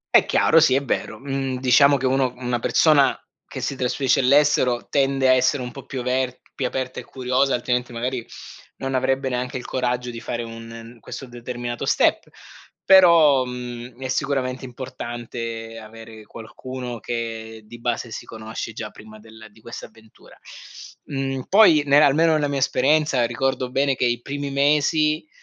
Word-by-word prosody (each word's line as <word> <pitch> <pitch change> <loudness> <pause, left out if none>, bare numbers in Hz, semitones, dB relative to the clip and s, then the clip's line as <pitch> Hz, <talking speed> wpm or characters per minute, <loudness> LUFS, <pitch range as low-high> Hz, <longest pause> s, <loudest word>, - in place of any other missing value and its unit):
È - - +6
chiaro, 165 - +4
sì 155 -5 +4
è 140 - +1
vero, 110 - -2
mhmm, 135 0 -3
diciamo 140 +3 +5
che 135 - -4
uno 130 -1 +1
una 125 -1 -2
persona 145 +2 +3 0.3
che - - -7
si 140 - -2
trasferisce 130 +1 +1
all'estero 135 -2 +3
tende 135 -1 +1
a 130 - +6
essere 130 +1 +2
un 125 - -6
po' 135 - -11
più 130 - -5
aver 125 0 -1
più 130 - -2
aperta 130 0 -4
e - - -8
curiosa 130 +1 0
altrimenti 125 0 -2
magari 125 +1 -3 0.5
non 135 0 -4
avrebbe 130 +1 0
neanche 125 0 -3
il 125 - -8
coraggio 125 -1 -2
di 115 - -8
fare 120 0 -4
un 115 +1 -10
questo 135 - -8
determinato 120 -1 -6
step - - +2 0.6
però, 170 -8 +6
mhmm, 125 0 -8
è - - -2
sicuramente 130 -1 -2
importante 120 -3 -7
avere 110 0 -12
qualcuno 125 +2 -8
che 115 -1 -5
di 120 +2 -12
base 120 0 -3
si - - -7
conosce 110 +1 -7
già 110 0 -7
prima 110 0 -14
del 110 0 -14
di 110 - -22
questa 115 - -9
avventura, 110 -1 -20 0.7
mhmm, 135 -2 -3
poi 190 -7 +6
ne 140 +1 +6
almeno 155 +3 +4
la 145 - 0
mia 140 -1 -2
esperienza 140 0 +2
ricordo 125 +1 -2
bene 135 +1 +1
che 125 - 0
i 120 0 0
primi 140 +2 -5
mesi, 150 +2 +2
125 Hz, 165 wpm, -22 LUFS, 120-135 Hz, 0.7 s, È